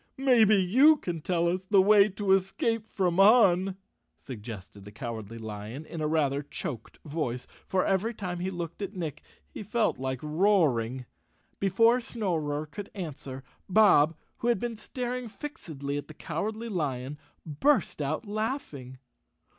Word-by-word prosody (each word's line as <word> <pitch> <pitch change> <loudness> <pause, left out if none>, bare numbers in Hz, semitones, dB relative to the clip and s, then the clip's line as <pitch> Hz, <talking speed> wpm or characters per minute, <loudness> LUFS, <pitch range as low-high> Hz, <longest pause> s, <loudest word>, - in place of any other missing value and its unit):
"Maybe 240 -6 +5
you 255 - +5
can 170 - -4
tell 170 +1 +1
us 185 +2 -1
the 195 +1 +4
way 205 +1 +6
to 195 0 -2
escape 210 +4 +1
from 180 -3 0
Un," 195 -3 +5 0.4
suggested 105 -5 -9
the 105 - -11
Cowardly 115 -1 -6
Lion 110 +6 -7
in 165 - -7
a 155 - 0
rather 145 -3 +1
choked 130 -4 -7
voice, 145 -5 -3 0.2
for 185 -1 +1
every 195 +4 +1
time 180 -6 -5
he 185 +2 -2
looked 175 0 -6
at 200 0 -5
Nick, 165 -5 -5 0.3
he - - -7
felt 215 - 0
like 130 0 -2
roaring. 150 - +2 0.5
Before 230 +6 +4
Snorer 160 -11 -2
could 195 +7 -8
answer, 140 -7 -6 0.3
Bob, 180 -6 +5 0.2
who 235 - -3
had 240 -5 +3
been 240 +2 -3
star¬ 250 +3 -4
ing 240 - -8
fixedly 160 - -6
at - - -9
the 155 - -12
Cowardly 215 +8 -4
Lion, 145 - -3 0.3
burst 170 - +1
out 155 +9 -2
laughing. 205 - -4
180 Hz, 150 wpm, -28 LUFS, 145-210 Hz, 0.5 s, way